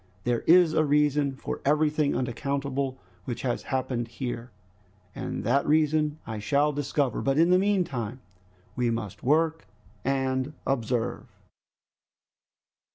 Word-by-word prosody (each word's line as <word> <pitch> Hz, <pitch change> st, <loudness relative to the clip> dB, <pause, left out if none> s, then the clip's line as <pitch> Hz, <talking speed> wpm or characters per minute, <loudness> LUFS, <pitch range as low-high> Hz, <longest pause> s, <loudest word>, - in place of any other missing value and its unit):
There 120 Hz, -1 st, +1 dB
is 170 Hz, -1 st, +6 dB
a 155 Hz, -, +3 dB
reason 145 Hz, -1 st, +2 dB
for 135 Hz, -, -5 dB
everything 150 Hz, 0 st, +2 dB
unaccountable 140 Hz, +1 st, -2 dB, 0.3 s
which 120 Hz, -, -4 dB
has 125 Hz, -2 st, -1 dB
happened 125 Hz, -3 st, -2 dB
here, 120 Hz, 0 st, -5 dB, 0.6 s
and -, -, -4 dB
that 135 Hz, +5 st, +2 dB
reason 150 Hz, 0 st, +2 dB
I 110 Hz, -1 st, -5 dB
shall 145 Hz, +7 st, +2 dB
discover. 145 Hz, -1 st, -1 dB
But 135 Hz, +1 st, +1 dB
in 170 Hz, +3 st, +5 dB
the 180 Hz, -, +6 dB
meantime 145 Hz, -, 0 dB, 0.6 s
we 125 Hz, -2 st, +1 dB
must 115 Hz, -4 st, -4 dB
work 160 Hz, +4 st, +1 dB, 0.4 s
and 135 Hz, +1 st, 0 dB
observe." 120 Hz, -3 st, -1 dB
140 Hz, 120 wpm, -27 LUFS, 125-150 Hz, 0.6 s, is